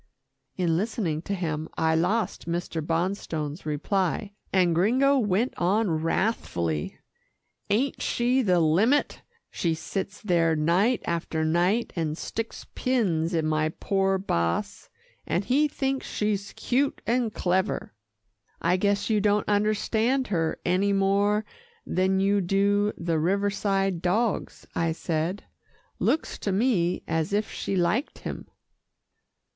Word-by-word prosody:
In 170 -3 +1
listening 185 -6 -1
to 200 +3 -3
him, 160 -3 -3
I 160 0 +2
lost 180 +4 0
Mr. 170 -1 -2
Bonstone's 165 -2 -2
reply, 190 +6 -1 0.2
and 180 -3 +3
Gringo 260 +11 +3
went 215 +2 +1
on 195 +3 +2
wrathfully, 90 - -1 0.7
"Ain't 250 +6 0
she 245 +2 +1
the 180 -7 +3
limit! 195 - +2 0.3
She 165 -2 0
sits 195 +5 -4
there 170 -5 +2
night 180 +10 +2
after 165 -2 -1
night 175 +8 +1
and 160 -3 -2
sticks 225 +5 -5
pins 180 -10 0
in 160 -1 +1
my 155 0 +1
poor 195 -1 +1
boss, 85 - -2 0.4
and 190 - 0
he 290 +4 +3
thinks 270 -2 -2
she's 205 -2 -2
cute 270 +3 0
and 235 -1 +1
clever." 190 - -1 0.7
"I 175 +2 +2
guess 200 +1 +1
you 215 -2 +2
don't 205 0 +2
understand 220 +5 +1
her 165 -5 0
any 190 +3 +2
more 200 +2 +2 0.4
than 190 +1 +1
you 200 +1 +2
do 200 +3 +2
the 170 -2 -1
Riverside 195 0 0
dogs," 210 +5 -1
I 165 -1 0
said. 165 +4 -2 0.6
"Looks 320 - 0
to 200 - -2
me 190 -4 +1
as 160 +3 -1
if 210 +1 0
she 195 - -3
liked 190 - 0
him." - - -7
195 Hz, 125 wpm, -26 LUFS, 170-210 Hz, 0.7 s, and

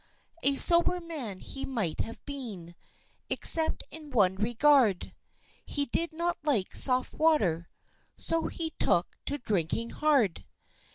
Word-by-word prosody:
A 280 0 +3
sober 340 +4 +6
man 290 - -5
he 270 - -6
might 220 -12 -4
have 230 - -6
been, 220 -12 -6 0.6
Except 320 -1 +3
in 310 -2 -9
one 205 -8 +2
regard, 235 -1 +1 0.5
He 285 -1 -3
did 335 +6 -3
not 340 +2 -3
like 275 -11 -1
soft 255 -1 +5
water, 195 - 0 0.5
So 330 0 -1
he 325 -1 -4
took 175 - +1 0.2
to 285 - -2
drinking 215 - -3
hard! 275 - 0
270 Hz, 125 wpm, -27 LUFS, 205-310 Hz, 0.6 s, sober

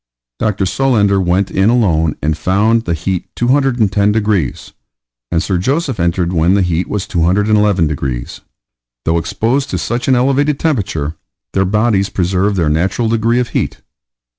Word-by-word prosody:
Dr. 105 -3 0
Solander 100 -4 +2
went 90 +2 0
in 95 +3 +2
alone 85 -10 +2
and 80 +1 +1
found 110 +7 +1
the 85 - -1
heat 90 +2 -3
210 120 -6 +2
degrees, 105 - -1 0.6
and 85 0 +1
Sir 95 -3 -1
Joseph 135 - -1
entered 85 +1 0
when 85 +3 +3
the 100 - +2
heat 90 0 -1
was 105 -3 -2
211 100 +2 +2
degrees. 65 -5 -4 0.6
Though 85 +1 +2
exposed 120 +10 -1
to - - -2
such 120 +3 -3
an 130 - +4
elevated 140 +3 +1
temperature, 90 - -2 0.4
their 95 0 +2
bodies 105 0 +1
preserved 95 +2 0
their 85 -4 +1
natural 95 +9 0
degree 115 +2 +1
of 125 - -1
heat. - - -3
100 Hz, 150 wpm, -15 LUFS, 85-115 Hz, 0.6 s, an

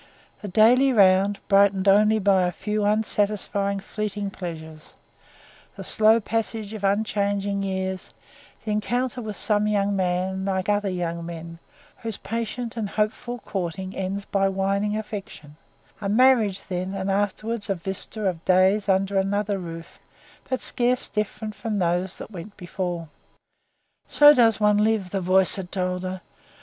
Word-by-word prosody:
The 210 - -6
daily 240 +7 +5
round, 195 -2 +4
brightened 195 -1 +3
only 210 +2 +5
by 190 -3 +3
a - - -1
few 210 +4 -2
unsatisfying, 205 -1 0
fleeting 205 -1 -4
pleasures; 160 -4 -8 0.8
the - - -8
slow 220 +1 +4
passage 220 -1 -3
of 215 -2 -7
unchanging 200 -1 0
years; 190 -1 -3 0.5
the 215 - -2
encounter 245 +4 -1
with 215 -2 -6
some 210 0 +1
young 200 -1 +1
man, 185 0 -1
like 190 -1 -1
other 205 -1 +1
young 170 -2 -3
men, 165 0 -8 0.4
whose 225 -3 -3
patient 230 +1 -4
and 220 -4 -3
hopeful 220 +3 -2
courting 190 0 -4
ends 195 +1 -3
by 195 0 +1
winning 200 +2 0
affection; 200 -8 -8 0.5
a 200 - -2
marriage 220 -4 +3
then, 185 +1 -3
and 195 0 -2
afterwards 205 +2 -2
a 195 - +1
vista 190 +4 -5
of 175 -4 -2
days 190 +3 +3
under 195 +1 +2
another 200 +1 -1
roof, 165 -2 -9 0.5
but 260 - -1
scarce 245 +1 +1
different 215 0 -3
from 210 0 -4
those 180 0 -1
that - - -9
went 200 +2 -9
before. 175 -2 -4 1.0
So 295 0 +7
does 230 -6 +4
one 210 -1 +3
live, 210 -4 +1
the 195 - -1
voice 185 +2 +3
had 185 -2 -6
told 180 -1 -2
her. 185 0 -5
200 Hz, 145 wpm, -24 LUFS, 185-215 Hz, 1.0 s, So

